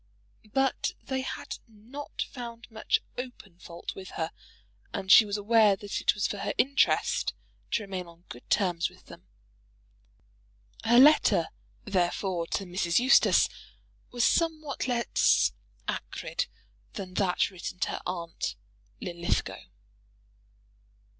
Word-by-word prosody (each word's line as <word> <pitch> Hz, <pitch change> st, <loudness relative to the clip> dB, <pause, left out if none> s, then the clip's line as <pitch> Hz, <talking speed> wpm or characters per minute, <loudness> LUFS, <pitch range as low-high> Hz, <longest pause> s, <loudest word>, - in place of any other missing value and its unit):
But 270 Hz, -1 st, +1 dB
they 265 Hz, -1 st, -2 dB
had 260 Hz, 0 st, -6 dB
not 230 Hz, +7 st, -7 dB
found 235 Hz, -2 st, -8 dB
much 220 Hz, 0 st, 0 dB, 0.2 s
open 230 Hz, -8 st, -9 dB
fault 170 Hz, -1 st, -7 dB
with 190 Hz, -1 st, -9 dB
her, 160 Hz, 0 st, -2 dB, 0.6 s
and 190 Hz, -1 st, -2 dB
she 220 Hz, -, +10 dB
was 205 Hz, 0 st, -2 dB
aware 210 Hz, -1 st, +4 dB
that 200 Hz, +1 st, -4 dB
it -, -, +3 dB
was 205 Hz, -, -1 dB
for 205 Hz, -, -2 dB
her -, -, -2 dB
interest 275 Hz, +2 st, +2 dB, 0.3 s
to 225 Hz, -, 0 dB
remain 190 Hz, -3 st, -5 dB
on 170 Hz, 0 st, -17 dB
good 120 Hz, -, -12 dB
terms 175 Hz, -4 st, +1 dB
with -, -, -20 dB
them. -, -, -14 dB, 1.6 s
Her 235 Hz, +1 st, +4 dB
letter, 295 Hz, +4 st, +6 dB, 0.3 s
therefore, 180 Hz, -2 st, 0 dB
to 195 Hz, -, -2 dB
Mrs. 175 Hz, -1 st, 0 dB
Eustace 255 Hz, +2 st, +5 dB, 0.6 s
was 240 Hz, -2 st, +1 dB
somewhat 310 Hz, -5 st, 0 dB
less 240 Hz, -2 st, +3 dB, 0.4 s
acrid -, -, -3 dB, 0.5 s
than 190 Hz, -3 st, -6 dB
that 185 Hz, 0 st, +1 dB
written 180 Hz, -1 st, -6 dB
to -, -, +1 dB
her -, -, -4 dB
aunt 170 Hz, -2 st, -4 dB, 0.5 s
Linlithgow. 170 Hz, -1 st, -2 dB
205 Hz, 125 wpm, -28 LUFS, 180-245 Hz, 1.6 s, she